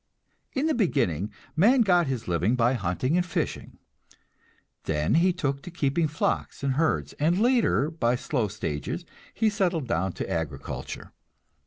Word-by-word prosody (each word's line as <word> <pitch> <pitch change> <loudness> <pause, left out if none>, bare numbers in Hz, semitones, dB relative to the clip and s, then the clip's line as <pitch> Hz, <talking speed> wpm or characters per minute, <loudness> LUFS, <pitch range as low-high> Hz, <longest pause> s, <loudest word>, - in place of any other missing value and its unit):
In 275 +3 0
the 320 - +2
beginning 115 - 0 0.2
man 235 +11 +5
got 180 -6 +4
his 130 -4 -3
living 90 +7 +1
by 120 +1 +3
hunting 120 - 0
and 180 - +3
fishing. 180 - -3 1.1
Then 75 0 0
he 175 +3 +4
took 140 -6 -2
to - - -8
keeping 160 -1 0
flocks 150 -1 -2
and 135 -1 +1
herds, 85 - 0
and 165 +5 +2
later 230 - +3
by 125 -7 +1
slow 125 -2 -1
stages 80 -8 -4 0.3
he 220 - +1
settled 180 - 0
down 95 -1 0
to - - -4
agriculture. 80 -6 -5
140 Hz, 150 wpm, -26 LUFS, -, 1.1 s, man